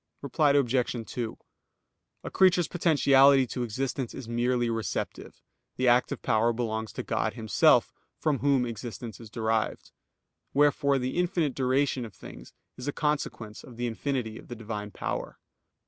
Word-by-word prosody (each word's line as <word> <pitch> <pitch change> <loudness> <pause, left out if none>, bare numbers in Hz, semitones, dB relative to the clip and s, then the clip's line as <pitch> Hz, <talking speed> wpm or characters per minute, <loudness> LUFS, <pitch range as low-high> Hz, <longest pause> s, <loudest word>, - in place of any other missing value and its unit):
Reply 140 +1 +2
Obj. 130 -3 +2 0.2
2: 115 -3 -4 0.9
A - - -6
creature's 185 -3 +4
potentiality 140 -5 +5
to 125 +1 -5
existence 125 +2 -3
is 130 - -8
merely 120 +1 +1
receptive; 115 -4 -4 0.4
the 130 - 0
active 120 +1 +2
power 115 -1 +2
belongs 110 -2 -3
to - - -4
God - - -1
Himself, 110 -4 +3 0.2
from 150 -4 0
Whom 140 -3 +2
existence 115 0 -7
is 115 -2 -11
derived. 110 0 -1 0.6
Wherefore 140 -1 +3
the 130 +3 -3
infinite 175 -5 +1
duration 130 0 +1
of 110 -5 -9
things - - -12 0.3
is 125 +2 -7
a - - +1
consequence 140 -8 -3
of 120 -2 -13
the 120 - -2
infinity 120 -1 -3
of - - -14
the 120 - -7
Divine 105 -2 -5
power. - - -4
125 Hz, 145 wpm, -28 LUFS, 115-140 Hz, 0.9 s, potentiality